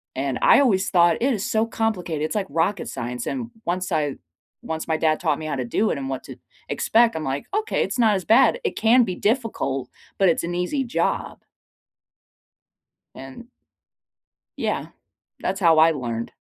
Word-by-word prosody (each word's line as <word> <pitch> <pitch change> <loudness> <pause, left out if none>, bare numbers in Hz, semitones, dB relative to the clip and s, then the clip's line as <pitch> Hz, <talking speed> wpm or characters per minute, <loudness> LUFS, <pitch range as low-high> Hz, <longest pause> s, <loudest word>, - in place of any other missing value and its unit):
and 135 0 -2
I - - +6
always 205 -9 +2
thought, 170 -3 +4
"It 265 +2 +2
is 205 -4 -3
so 220 0 +2
complicated, 190 -9 -2
it's 155 - -2
like 205 -2 0
rocket 165 +6 -1
science," 125 +1 -5
and 245 -3 -4 0.2
once 185 +2 -2
I 150 -4 0 0.5
once 160 0 -5
my 160 -1 0
dad 155 -1 +1
taught - - 0
me 155 - -6
how - - -2
to 130 -2 -3
do 210 - 0
it, - - -1
and 135 -1 -5
what 135 -1 -4
to - - -9 0.3
expect, 230 +1 +2
I'm 160 - -3
like, 135 0 -3
"Okay, 435 +1 0
it's - - -4
not 220 -3 +4
as 185 -3 -3
bad. 265 - +4
It 445 - -2
can 240 +3 +5
be 185 -5 -3
difficult, 205 - -1 0.3
but 195 -2 +5
it's 165 - 0
an 170 +1 -3
easy 180 +11 -1
job." 230 -9 -2 1.8
And 135 - -10 1.1
Yeah, - - -2 0.5
that's 195 - -2
how 165 -4 +4
I 160 +1 +6
learned. 120 -6 -4
175 Hz, 180 wpm, -23 LUFS, 150-225 Hz, 1.8 s, I